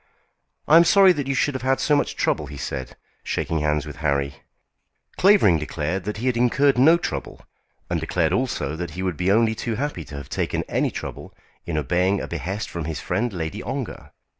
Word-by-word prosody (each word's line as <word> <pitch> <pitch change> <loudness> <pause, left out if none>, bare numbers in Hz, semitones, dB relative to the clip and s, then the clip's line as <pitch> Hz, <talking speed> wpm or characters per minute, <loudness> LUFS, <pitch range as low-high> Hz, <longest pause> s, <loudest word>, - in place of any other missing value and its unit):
"I 160 - +7
am 170 - +8
sorry 190 +1 +6
that 145 -4 -3
you 135 - 0
should 145 - +1
have 130 - -4
had 130 +1 +1
so 145 +2 +3
much 145 - 0
trouble," 75 - 0
he 70 0 -9
said, 65 -2 -5 0.3
shaking 80 - -2
hands 75 -1 0
with 75 -1 -9
Harry. 70 -2 -1 0.8
Clavering 185 - +5
declared 80 +4 -3
that 105 0 -3
he 115 - -4
had 130 -2 +2
incurred 135 +4 +3
no 160 +6 +7
trouble, 70 - -5 0.4
and - - -1
declared - - 0
also 75 - -1
that 85 +1 -4
he 95 - -2
would 90 -3 -1
be 90 +5 +1
only 110 +1 +3
too 110 +1 -3
happy 135 - -3
to 75 - -10
have 70 -1 -8
taken - - -2
any - - 0
trouble - - -7 0.3
in 85 -2 -2
obeying 90 +7 +1
a - - -5
behest 100 +5 -4
from 85 -3 -5
his 80 -1 -4
friend 120 +2 -1
Lady 90 +3 -4
Ongar. 135 -1 -5
95 Hz, 205 wpm, -23 LUFS, -, 0.8 s, am